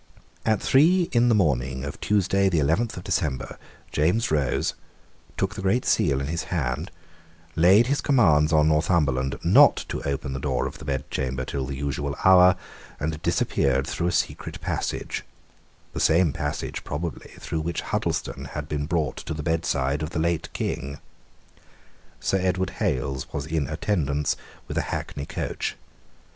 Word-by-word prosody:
At 110 -2 +3
three 170 +6 +4
in 120 -1 +4
the 115 - +4
morning 70 -7 +1
of 70 - -7
Tuesday 100 -1 +2
the 85 - 0
eleventh 80 +11 +1
of 90 - -6
December, 75 -8 -2 0.3
James 90 +10 +1
rose, 75 -4 +1 0.6
took 95 +1 0
the 105 - -6
Great 95 +7 +1
Seal 70 - +2
in 70 - -2
his 80 +4 -3
hand, 75 0 -2 0.7
laid 95 +7 +6
his 140 +3 0
commands 80 - +4
on 75 -1 +4
Northumberland 75 -5 +1
not - - +6
to - - -3
open 70 0 -3
the 65 - -3
door 65 -2 -1
of - - -6
the - - -9
bedchamber 65 -2 -2
till 65 -1 -3
the 70 - -4
usual 70 0 -3
hour, 90 -1 +7 0.4
and 75 +1 -3
disappeared 65 -4 +1
through 85 +2 -2
a - - +1
secret - - -2
passage; - - -3 0.7
the - - -4
same 80 -1 +3
passage 75 0 -4
probably 80 +2 -5
through 80 - -3
which 85 +2 -2
Huddleston - - -2
had 75 -1 -4
been 75 -1 -2
brought 80 -5 -1
to 80 - -5
the 75 - -5
bedside 75 -4 0
of 75 - -2
the 85 - -3
late 85 0 -1
king. 70 +2 -3 1.2
Sir 95 - +1
Edward 95 0 0
Hales 65 0 -1
was 70 - -3
in 80 -3 -1
attendance 75 -8 0 0.3
with - - -2
a - - -3
hackney 70 0 -4
coach. - - -3
75 Hz, 160 wpm, -25 LUFS, 70-90 Hz, 1.2 s, hour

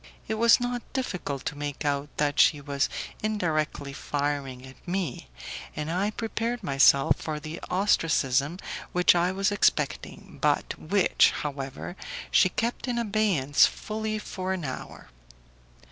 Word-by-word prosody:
It - - -1
was 230 +1 +5
not 245 0 -2
difficult 180 - -3
to - - -2
make 145 0 -5
out 145 0 0
that 145 -1 +1
she 150 - +5
was 140 -1 -1 0.3
indirectly 155 -9 -1
firing 140 -3 -3
at 130 +6 -15
me, 175 - -3 0.5
and 150 +1 -3
I 190 +4 +1
prepared 230 +2 -3
myself 140 -2 +5
for 155 -1 -3
the 155 +3 -7
ostracism 160 -6 +2 0.4
which 180 0 +5
I 175 +1 +2
was 195 +2 +1
expecting, 205 - 0
but - - +1
which, 195 +4 +3
however, 140 +3 -5 0.4
she 185 - +5
kept 235 +7 -2
in 245 -1 -1
abeyance 205 - +3
fully 215 0 -4
for 190 -3 -4
an 180 -5 -4
hour. 130 - -7
165 Hz, 135 wpm, -27 LUFS, 145-210 Hz, 0.5 s, was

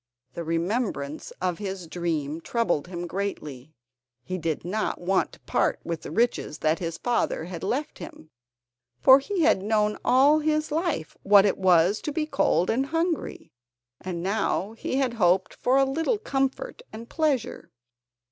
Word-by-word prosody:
The 170 - -5
remembrance 165 - -2
of 180 -2 -1
his 190 -3 -5
dream 160 -3 -3
troubled 180 -8 -1
him 175 -1 -5
greatly. 155 -7 -5 0.5
He 185 +6 -4
did 160 -2 -3
not 215 +5 -2
want 185 +2 0
to - - -15
part - - 0
with 165 -1 -4
the - - -8
riches 235 -9 0
that 155 +1 +1
his 165 -2 -4
father 240 -8 0
had 175 0 -7
left 270 +9 -2
him, 155 - -11 0.7
for 265 0 +8
he 360 +6 -2
had 300 -11 +4
known 210 0 +1
all 275 +5 +5
his 310 0 0
life 320 - -2
what 200 0 +6
it 200 - +1
was 185 +1 +4
to 300 - -3
be 305 +1 -1
cold 185 - +1
and 265 +4 0
hungry, 330 +1 -2 0.5
and 175 -2 -5
now 200 0 0
he 230 - -4
had 265 -3 +1
hoped 180 +1 +3
for 255 +2 +1
a 270 - +5
little 325 - 0
comfort 275 - -2
and 230 +2 -9
pleasure. 260 - -1
200 Hz, 160 wpm, -26 LUFS, 170-270 Hz, 0.7 s, for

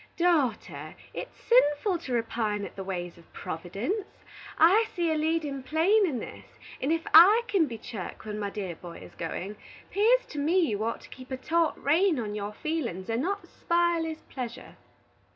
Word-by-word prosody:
"Daughter, 315 -10 0 0.2
it's - - -7
sinful 370 -5 +3
to 260 -7 -5
repine 220 -3 -1
at - - -10
the 195 - -5
ways 175 -2 -5
of 170 - -21
Providence. 225 - -4 0.4
I 385 +8 +6
see 340 -2 +1
a - - +1
leadin' 305 -3 -1
plain 345 +10 +3
in 275 -7 -2
this, - - -9 0.2
and 275 - 0
ef 330 0 +1
I 395 +9 +9
can 390 -7 +2
be 230 -3 -6
chirk 220 -4 -7
when 210 0 -4
my 205 -1 -2
dear 195 -4 -5
boy 170 0 -10
is - - -12
goin', 185 +5 -5 0.3
'pears 465 +5 +4
to 300 - -5
me 315 +6 +2
you 215 - +1
ought 230 +1 -2
to - - -14
keep 255 0 -11
a 260 - -3
taut 325 +4 +1
rein 330 +3 +3
on 210 -3 -3
your 205 0 -4
feelin's, 215 - -3
and 230 +2 0
not 400 +6 -2
spile 340 -1 +1
his 320 -1 -5
pleasure." 245 -3 -7
290 Hz, 185 wpm, -28 LUFS, 210-340 Hz, 0.4 s, I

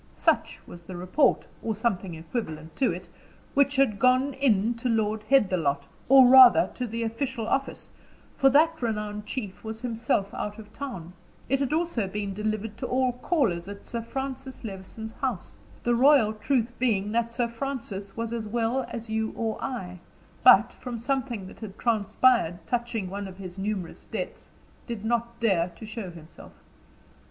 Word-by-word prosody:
Such - - +1
was 175 - -11
the 180 +2 -9
report, 185 +12 +2 0.2
or 220 -1 -2
something 195 -5 -1
equivalent 160 -2 -5
to 265 - +3
it, - - -7 0.5
which 280 0 +3
had 265 -7 +2
gone 255 +3 +3
in 235 -5 +2
to 245 +2 -2
Lord 220 -1 0
Headthelot, 180 - +3 0.3
or 265 -1 +9
rather, 255 -1 +8
to 250 - -3
the 230 +1 -3
official 230 0 -3
office, 275 +3 -2 0.5
for 270 - +5
that 320 +3 +4
renowned 210 -2 -3
chief 210 -8 -5
was 220 0 -5
himself 225 -4 -1
out 210 0 -4
of 215 -1 -12
town; 185 -12 -7 0.3
it 270 +1 +1
had 275 -1 -1
also 315 - 0
been 200 0 -3
delivered 215 +1 -3
to - - -4
all 255 0 +2
callers 240 - 0
at 200 0 -9
Sir 235 - -4
Francis 265 +2 -6
Levison's 220 +2 -7
house; 215 - -4 0.3
the 240 - +2
royal 245 -3 +5
truth 235 +2 0
being 210 -5 +1
that 235 +1 0
Sir 240 0 0
Francis 230 -6 -5
was 230 0 -3
as 225 -2 -3
well 235 +3 0
as 230 0 -6
you 220 0 0
or 225 -1 -3
I, 185 -9 -5 0.4
but, 240 -2 +7
from 245 -2 -6
something 240 -3 -2
that 185 - -12
had 210 -4 -8
transpired 215 -5 +2
touching 235 -2 -2
one 200 +2 -5
of 185 -1 -11
his 190 -1 -8
numerous 195 -3 -4
debts, - - -6 0.4
did 225 -3 -5
not 235 0 -1
dare 190 -7 +2
to 220 - -9
show 215 -3 -6
himself. 165 -2 -13
225 Hz, 165 wpm, -27 LUFS, 200-250 Hz, 0.5 s, or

